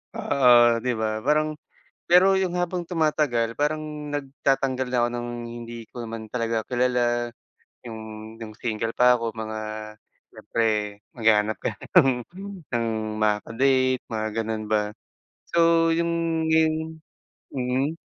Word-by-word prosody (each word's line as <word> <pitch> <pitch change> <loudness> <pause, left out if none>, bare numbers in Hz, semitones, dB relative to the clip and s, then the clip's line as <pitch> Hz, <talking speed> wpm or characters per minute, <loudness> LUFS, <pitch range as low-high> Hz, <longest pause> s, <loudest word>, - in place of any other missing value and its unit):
Oo, 120 -3 +5
'di 125 - +1
ba? 110 - +1 0.2
Parang 150 +1 +3 0.6
pero 190 +2 +6
yung 185 -2 -1
habang 175 0 -1
tumatagal 150 -9 +1
parang 150 +1 0 0.3
nagtatanggal 135 -2 0
na 125 - -1
ako 120 - +2
ng 120 0 -3 0.3
hindi 120 0 -8 0.2
ko - - -56
naman 110 -1 -7
talaga 115 -2 -1
kilala. 120 -1 +1 0.5
Yung, 110 -1 -7 0.4
nung 110 -1 -6
single 115 -1 -2
pa 125 0 +6
ako 115 -1 -2
mga 110 0 -4 0.8
siyempre, 115 - -3 0.5
maghahanap 110 -2 +3
ka - - 0 0.3
ng 125 -3 0 0.5
ng 115 -1 +1 0.3
makaka-date, 130 +5 +2
mga 110 -1 -1
gano'n 110 -1 -3
ba, 105 -1 +1 0.6
so 165 -1 +4
yung 165 -1 0
yung, 160 0 +1 0.5
mm. 130 +4 -1
125 Hz, 125 wpm, -25 LUFS, 115-155 Hz, 0.8 s, pero